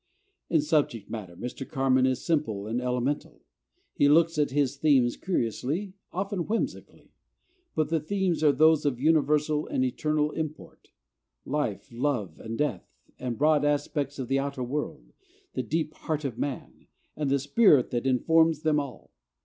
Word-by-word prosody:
In 160 Hz, -, +3 dB
subject 145 Hz, -8 st, 0 dB
matter 100 Hz, -7 st, -6 dB
Mr. 125 Hz, +6 st, -6 dB
Carman 130 Hz, -1 st, +2 dB
is 130 Hz, -1 st, -2 dB
simple 145 Hz, -, 0 dB
and 115 Hz, +3 st, -2 dB
elemental. 125 Hz, +3 st, -2 dB, 0.5 s
He 145 Hz, -, +3 dB
looks 165 Hz, +1 st, +4 dB
at 145 Hz, -, +2 dB
his 140 Hz, 0 st, +1 dB
themes 135 Hz, -5 st, +3 dB
curiously, 170 Hz, -, -2 dB, 0.2 s
often 195 Hz, -1 st, -3 dB
whimsically; 225 Hz, +2 st, -4 dB, 0.6 s
but 155 Hz, -1 st, +1 dB
the 165 Hz, 0 st, +1 dB
themes 175 Hz, -1 st, -1 dB
are 150 Hz, -, +6 dB
those 155 Hz, +2 st, +4 dB
of 135 Hz, -4 st, 0 dB
universal 150 Hz, 0 st, +2 dB
and 130 Hz, -, 0 dB
eternal 150 Hz, +4 st, 0 dB
import, 155 Hz, -1 st, -7 dB, 0.6 s
life, 115 Hz, -9 st, -2 dB
love, 120 Hz, -, -2 dB
and 115 Hz, 0 st, -6 dB
death, 135 Hz, -12 st, -1 dB, 0.3 s
the 125 Hz, -, -3 dB
broad 150 Hz, +5 st, +2 dB
aspects 145 Hz, -1 st, -1 dB
of 130 Hz, -3 st, -4 dB
the 135 Hz, +2 st, +1 dB
outer 140 Hz, -2 st, -3 dB
world, 145 Hz, +5 st, -5 dB, 0.4 s
the -, -, -1 dB
"deep 155 Hz, -1 st, -2 dB
heart 155 Hz, -2 st, -3 dB
of 130 Hz, -5 st, -3 dB
man," 135 Hz, +1 st, -5 dB, 0.3 s
and 150 Hz, -2 st, -1 dB
the 140 Hz, -, +3 dB
spirit 140 Hz, -, +4 dB
that 120 Hz, +2 st, -1 dB
informs 160 Hz, +4 st, +3 dB
them 155 Hz, -1 st, +3 dB
all. 140 Hz, -4 st, -7 dB
145 Hz, 155 wpm, -27 LUFS, 125-155 Hz, 0.6 s, are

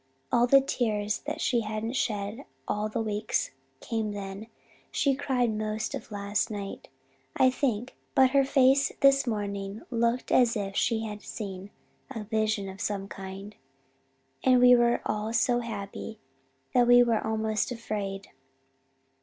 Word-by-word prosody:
All 240 Hz, +1 st, +4 dB
the 275 Hz, +2 st, +7 dB
tears 215 Hz, -6 st, -1 dB
that -, -, -3 dB
she 240 Hz, -2 st, +2 dB
hadn't 215 Hz, +2 st, -3 dB
shed 215 Hz, +1 st, -2 dB, 0.2 s
all 210 Hz, +1 st, -1 dB
that -, -, -3 dB
week 215 Hz, -1 st, -2 dB, 0.5 s
came 220 Hz, -2 st, -2 dB
then. 200 Hz, +1 st, -6 dB, 0.4 s
She 280 Hz, -2 st, +1 dB
cried 260 Hz, -4 st, 0 dB
most 215 Hz, +2 st, -3 dB
of 270 Hz, -5 st, -6 dB
last 205 Hz, +2 st, -1 dB
night, 200 Hz, -2 st, -6 dB, 0.5 s
I 260 Hz, -, +5 dB
think, 250 Hz, -3 st, -2 dB, 0.2 s
but 260 Hz, -1 st, +5 dB
her 275 Hz, 0 st, +4 dB
face 270 Hz, 0 st, +4 dB
this 275 Hz, -1 st, +5 dB
morning 200 Hz, -2 st, -3 dB
looked 235 Hz, +1 st, 0 dB
as 240 Hz, -2 st, +4 dB
if 195 Hz, -1 st, -4 dB
she 225 Hz, +1 st, +1 dB
had 210 Hz, -1 st, -6 dB
seen 195 Hz, -2 st, -7 dB, 0.4 s
a 225 Hz, -5 st, -5 dB
vision 215 Hz, -1 st, -1 dB
of 190 Hz, +1 st, -8 dB
some 195 Hz, -1 st, -2 dB
kind, 195 Hz, +1 st, -8 dB, 0.9 s
and 255 Hz, -1 st, +5 dB
we 250 Hz, 0 st, +8 dB
were 240 Hz, 0 st, +3 dB
all 215 Hz, +1 st, -2 dB
so 240 Hz, +1 st, +2 dB
happy 220 Hz, -1 st, -6 dB, 0.6 s
that 245 Hz, -1 st, +4 dB
we 245 Hz, 0 st, +8 dB
were 230 Hz, -2 st, +1 dB
almost 220 Hz, 0 st, -1 dB
afraid. 205 Hz, -4 st, -4 dB
220 Hz, 145 wpm, -28 LUFS, 205-245 Hz, 0.9 s, we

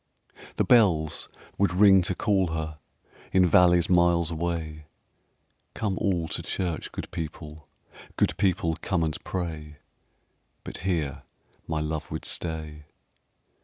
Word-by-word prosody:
The -, -, +2 dB
bells 85 Hz, -11 st, +3 dB, 0.3 s
would 100 Hz, -2 st, +2 dB
ring 95 Hz, -1 st, +7 dB
to 90 Hz, +1 st, -1 dB
call 95 Hz, -1 st, +1 dB
her 80 Hz, -1 st, -4 dB, 0.5 s
In 95 Hz, -1 st, +5 dB
valleys 90 Hz, 0 st, +5 dB
miles 85 Hz, -2 st, +3 dB
away: 80 Hz, -2 st, -3 dB, 0.9 s
"Come 100 Hz, -3 st, -1 dB
all 90 Hz, -4 st, 0 dB
to -, -, -3 dB
church, 85 Hz, -4 st, -3 dB
good -, -, -7 dB
people; 80 Hz, -1 st, -7 dB, 0.5 s
Good -, -, +2 dB
people, 85 Hz, -4 st, +1 dB
come 90 Hz, -4 st, 0 dB
and 80 Hz, -1 st, -3 dB
pray." 80 Hz, -5 st, -5 dB, 0.9 s
But -, -, -6 dB
here 80 Hz, -7 st, -2 dB, 0.5 s
my 80 Hz, -1 st, -1 dB
love 75 Hz, 0 st, -3 dB
would -, -, -5 dB
stay. 80 Hz, -2 st, -5 dB
85 Hz, 125 wpm, -26 LUFS, 80-90 Hz, 0.9 s, ring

